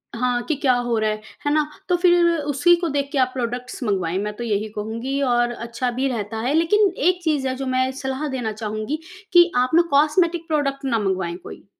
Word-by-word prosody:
हाँ। 245 0 0
कि 310 - +1
क्या 260 -2 +2
हो 240 -2 0
रहा 215 0 +1
है, 215 0 -3 0.2
है 290 - +2
ना? 305 -1 +2 0.2
तो 355 - +4
फिर 350 -1 +4
उसी 295 +4 +3
को 340 - 0
देख 280 0 -1
के 280 - -2
आप 255 0 +2
प्रोडक्ट्स 250 +1 -4
मँगवाएँ, 185 -5 -1
मैं 210 0 -3
तो 240 - -4
यही 215 -1 -1
कहूँगी 230 +6 -3
और 240 -2 +2
अच्छा 235 +1 -3
भी 260 +3 -1
रहता 220 -3 -3
है। 285 - +1
लेकिन 380 +5 +3
एक 360 +4 +2
चीज़ 295 -5 0
है, 260 - -2
जो 270 +1 -5
मैं 260 0 +1
सलाह 265 +3 -3
देना 250 -5 -3
चाहूँगी 215 +7 -4 0.3
कि 345 0 +7
आप 250 +1 +3
ना 340 - +7
कॉस्मेटिक 330 +4 +2
प्रोडक्ट 280 -3 -1
ना 230 -4 +1
मँगवाएँ 185 -3 -2
कोई। - - -11
260 Hz, 220 wpm, -22 LUFS, 230-300 Hz, 0.3 s, कि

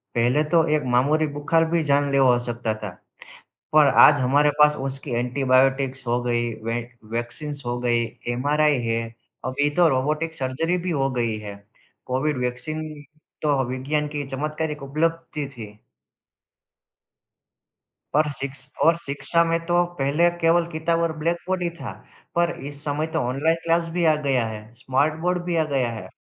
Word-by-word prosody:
पहले 120 +6 +3
तो 165 -2 +5
एक 150 - 0
मामूली 150 +5 +3
बुखार 165 +3 +2
भी 170 -2 +2
जानलेवा 140 -2 +3
हो - - +3
सकता 120 -2 -2
था। 105 - -3 0.8
पर 155 -1 +6 0.2
आज 145 -2 +4
हमारे 140 +4 +3
पास 150 0 +6
उसकी 135 0 -6
एंटीबायोटिक्स 130 +1 +1
हो 120 +1 +1
गई, 120 -1 0
वैक 120 +1 -4 0.2
वैक्सीन्स 140 +5 -4
हो 120 0 -1
गई, 120 -1 +1 0.2
एमआरआई 145 +4 +2
है 115 0 0 0.4
और 130 - -1
अभी 145 +2 +1
तो 175 -2 +6
रोबोटिक 150 +4 0
सर्जरी 160 +6 -1
भी - - 0
हो 135 0 +1
गई 115 -2 0
है, 105 -1 -7 0.5
कोविड 130 +2 0
वैक्सीन 125 +6 -3 0.6
तो 145 -3 +2
विज्ञान 145 +4 -1
की 145 -1 -3
चमत्कारिक 150 +2 -3
उपलब्धि 155 +1 -2
थी। 110 -6 -11 2.4
और 150 -1 +3
शिक्ष 135 0 -7 0.2
और 165 +1 +5
शिक्षा 145 +2 0
में 165 0 +1
तो 175 0 +3
पहले 145 +5 +3
केवल 165 +1 +3
किताब 165 +1 0
और 165 - 0
ब्लैक 170 +3 0
बोर्ड 185 -1 0
ही 175 - 0
था। - - -5 0.4
पर 170 0 +2 0.2
इस 145 0 -14
समय 150 +1 -1
तो - - +2
ऑनलाइन 150 +6 +1
क्लास 165 0 +1
भी 175 0 0
आ 155 -1 +5
गया 125 -4 +2
है, 110 -1 -7
स्मार्ट 135 +5 0
बोर्ड 180 0 0
भी 175 -1 -1
आ 160 - +3
गया 125 -3 +1
है, 110 -2 -7
145 Hz, 165 wpm, -23 LUFS, 125-160 Hz, 2.4 s, पर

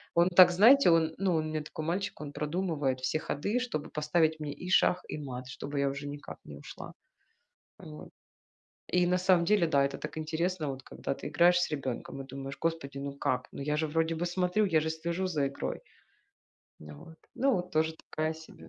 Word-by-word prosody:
Он 170 +2 +5
так, 180 0 +8
знаете, 230 +8 +7
он, 160 -1 +3
ну, 190 -3 +1
он 155 0 0
у - - -3
меня 155 0 -2
такой 155 +1 -7
мальчик, 185 0 -2
он 145 - -6
продумывает 150 -4 -1
все 130 - 0
ходы, 200 - -1
чтобы 225 -12 -3
поставить 155 +1 +1
мне 150 -1 -4
и 180 - -8
шах, 180 0 +3
и - - -3
мат, 130 -3 -6
чтобы 140 +2 -6
я 140 0 +2
уже 140 +1 -5
никак 145 0 -8
не - - -9
ушла. - - -10 0.9
Вот. 75 0 -10 0.9
И 180 -1 +4
на 180 +1 +2
самом 180 -1 +4
деле, 200 -1 +3
да, 140 -3 +3
это 135 0 -2
так 150 - -7
интересно, 160 +1 -2
вот 130 0 -7
когда - - -7
ты - - -6
играешь 175 +4 +4
с - - -1
ребенком 135 -1 -5
и - - -5
думаешь: 135 +1 -7
Господи, 160 -4 -2
ну 140 0 -6
как? 125 -2 -1
Ну - - -6
я 150 +1 0
же 155 +1 0
вроде 160 +2 0
бы 170 +2 -2
смотрю, 180 +4 +1
я 165 -5 +3
же 160 +1 -2
слежу 170 +3 -2
за 155 -6 0
игрой. 135 - -4 1.0
Н 75 - -11
э, - - -9
вот. 160 - -14 0.2
Ну 270 +1 +2
вот 180 -1 -3
тоже 160 0 +1 0.2
такая 155 +1 -1
себе 160 0 -13
160 Hz, 210 wpm, -30 LUFS, 145-180 Hz, 1.0 s, так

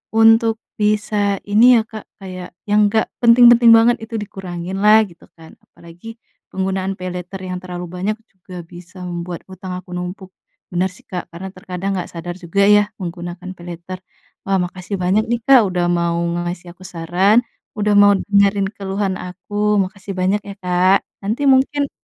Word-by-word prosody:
untuk 225 0 +5 0.2
bisa 210 -1 +1
ini 235 +5 +6
ya - - +3
Kak, 215 -2 -9
kayak 185 -2 -8 0.2
yang 210 0 +4
gak 220 0 +1
penting-penting 240 0 +7
banget 235 +2 +4
itu 225 +1 -7
dikurangin 185 -2 -6
lah 215 +1 +7
gitu 170 -1 -18
kan, 160 0 -14
apalagi, 175 +7 -13 0.4
penggunaan 190 0 -2
paylater 180 +1 -6
yang 185 -1 -5
terlalu 180 -1 -6
banyak 180 +4 -2 0.2
juga 185 -2 -11
bisa 175 +2 -13
membuat 175 -1 -5
hutang 185 0 -8
aku 185 - -12
numpuk, 180 +2 -6 0.4
bener 180 +1 +1
sih - - -18
Kak 180 -1 -5
karena 190 +3 -7
terkadang 185 +1 -5
nggak 180 - -4
sadar 175 +1 -6
juga 180 +2 -1
ya 205 0 +6 0.2
menggunakan 175 +1 -6
paylater. 175 +1 -8 0.5
Wah, 195 0 +1
makasih 180 +2 -5
banyak 195 +5 +2
nih, 235 -1 0
Kak, 270 -3 +7
udah 180 -1 0
mau 170 -1 0 0.3
ngasih 175 0 -6
aku 185 - -14
saran, 185 +5 +2 0.4
udah 210 0 +1
mau 205 0 +7
dengerin 200 0 +2
keluhan 195 0 -2
aku, 205 +3 -1
makasih 195 +1 -6
banyak 190 +3 +1
ya 200 - -7
Kak, 180 +2 +3 0.3
nanti 225 +8 -1
mungkin 275 +2 +2
190 Hz, 160 wpm, -19 LUFS, 180-210 Hz, 0.5 s, penting-penting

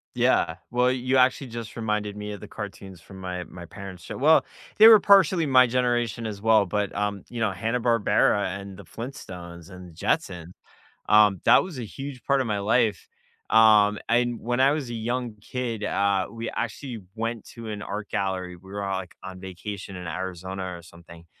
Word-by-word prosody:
Yeah. - - +2 0.2
Well, 125 +1 +3
you 130 +1 -1
actually 130 +1 +3
just 115 -2 -7
reminded 105 -2 -2
me 105 0 -5
of 100 - -9
the 105 - -9
cartoons 100 -3 -8
from 95 +4 -14
my 90 -1 -5
my 85 +2 -11
parent's 95 0 -10
show. - - -7
Well, 155 +4 +5 0.3
they 220 - +10
were 220 -2 +10
partially 190 -4 +5
my 130 -3 +6
generation 120 -2 0
as 105 -2 -5
well, 110 -2 +4
but, 100 +1 -2
um, 100 -1 -2
you 120 - -6
know, 110 -3 +1
Hanna-Barbera, 105 -2 +1
and 100 -1 -9
the 100 - -11
Flintstones, 90 - -9
and 90 -1 -11
the 85 - -15
Jetsons, 85 +1 -2 0.6
um, 105 -3 +5
that - - +6
was 180 -8 -8
a 120 - -4
huge 135 +2 -8
part 140 -1 +2
of 130 - -1
my 105 -2 -1
life, 110 0 +1 0.4
um, 105 -2 +6
and 120 0 +1
when 120 +2 -1
I 135 +1 +6
was 150 -4 -3
a 120 - -5
young 120 +1 -3
kid, 115 -3 -4
uh, 100 -2 +1
we 115 0 -5
actually 120 0 -5
went 115 0 -3
to 115 -2 -9
an 105 -1 -5
art 100 0 -5
gallery, 95 -3 -2
we 95 +2 -16
were 100 0 -4
all, 95 -1 -2
like, 95 -2 -9
on 95 -1 -9
vacation 95 +1 -7
in 90 0 -7
Arizona 95 +2 -5
or - - -14
something, 85 0 -15
105 Hz, 195 wpm, -25 LUFS, 95-120 Hz, 0.6 s, they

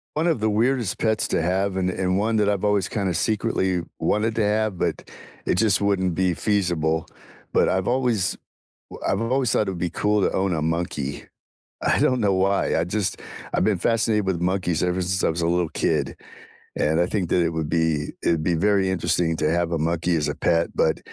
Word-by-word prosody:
One 160 +3 +1
of 160 - +1
the 110 0 0
weirdest 115 0 0
pets 110 -1 +1
to - - 0
have, 95 +2 0
and 95 -1 0
and 95 0 -1
one 110 +3 +1
that 105 -1 +2
I've 100 0 0
always 100 -3 +1
kinda 100 -4 -1
secretly 95 -3 0 0.2
wanted 110 +2 0
to 110 - +2
have, 105 -2 0
but - - -2 0.3
it - - +1
just 105 -1 +2
wouldn't 95 -3 +1
be 90 -1 +1
feasible, 85 -6 0 0.4
but - - +3
I've 95 0 0
always 120 -7 +1 0.5
w - - -7
I've 95 +3 +1
always 125 +1 +1
thought 105 - +1
it'd 90 -2 -4
be 90 - -1
cool 105 +4 0
to - - +1
own 95 -1 0
a 80 - 0
monkey. 80 -4 -3 0.6
I - - +2
don't 130 -2 +2
know 100 -2 +2
why, 95 -1 +1
I 80 - +1
just 95 +2 -2 0.3
I've - - +1
been 105 -3 +2
fascinated 110 0 +1
with 95 -3 -1
monkeys 90 -2 0
ever 90 +1 0
since 95 +1 -1
I - - +3
was 85 +1 -2
a - - +2
little 85 -1 +1
kid, - - -1 0.6
and 80 +2 +1
I 85 - +3
think 95 -3 -2
that 90 - +3
it 85 - +1
would 80 -2 -3
be 80 -3 0
it'd 80 -2 +2
be 85 +1 +1
very 100 +1 +2
interesting 85 -2 0
to 75 - 0
have 85 0 0
a 85 - -1
monkey 85 +2 0
as 75 -2 0
a - - -2
pet, 85 0 +1
but 80 - +2
95 Hz, 215 wpm, -23 LUFS, 85-105 Hz, 0.6 s, but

